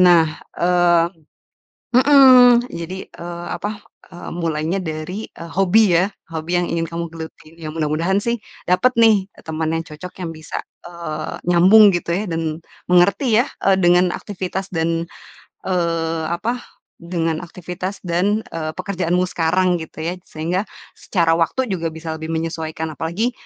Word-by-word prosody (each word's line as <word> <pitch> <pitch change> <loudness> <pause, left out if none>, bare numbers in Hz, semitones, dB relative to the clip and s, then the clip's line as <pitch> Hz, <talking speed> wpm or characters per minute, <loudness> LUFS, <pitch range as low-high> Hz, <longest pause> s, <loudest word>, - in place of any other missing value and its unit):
Nah, 175 -3 +7 0.3
eee 175 -1 +3 0.8
mmm 255 -2 +7
jadi, 180 +3 -6
eee, 170 0 -8
apa, 205 0 -5 0.3
eee, 175 - -8
mulainya 165 +1 -1
dari, 165 +5 -5
eee, 170 0 -10
hobi 195 +1 +4
ya, 185 +3 +3 0.2
hobi 165 +2 -2
yang 175 - -1
ingin 165 0 -1
kamu 170 +1 -4
geluti. 160 0 -10
Ya 160 -2 -7
mudah-mudahan 165 +5 0
sih, 235 +2 -1 0.3
dapat 250 +8 +3
nih 210 -4 +5 0.2
teman 160 0 -2
yang 165 0 -2
cocok 160 +4 -9
yang 165 - -3
bisa, 155 0 -6 0.3
eee, 165 -3 -5
nyambung 190 +5 +7
gitu 170 0 -2
ya 200 +4 -1
dan 165 -1 -3 0.3
mengerti 200 +6 +4
ya, - - -6 0.2
eee, 195 -1 +5
dengan 175 +1 +4
aktivitas 190 -1 -5
dan, 165 0 0 0.6
eee, 165 -3 0
apa, 235 +8 -2 0.4
dengan 165 -2 -2
aktivitas 180 +3 -6
dan, 190 +5 +1
eee, 155 -1 -3
pekerjaanmu 180 -1 0
sekarang 180 +2 +1
gitu 160 0 -9
ya, 175 - -1
sehingga 170 +5 -2 0.3
secara 165 -4 +1
waktu 220 +10 0
juga 170 -4 -2
bisa 160 0 -5
lebih 160 0 -7
menyesuaikan, 160 0 -3
apalagi, 185 +11 -1
175 Hz, 145 wpm, -20 LUFS, 165-190 Hz, 0.8 s, Nah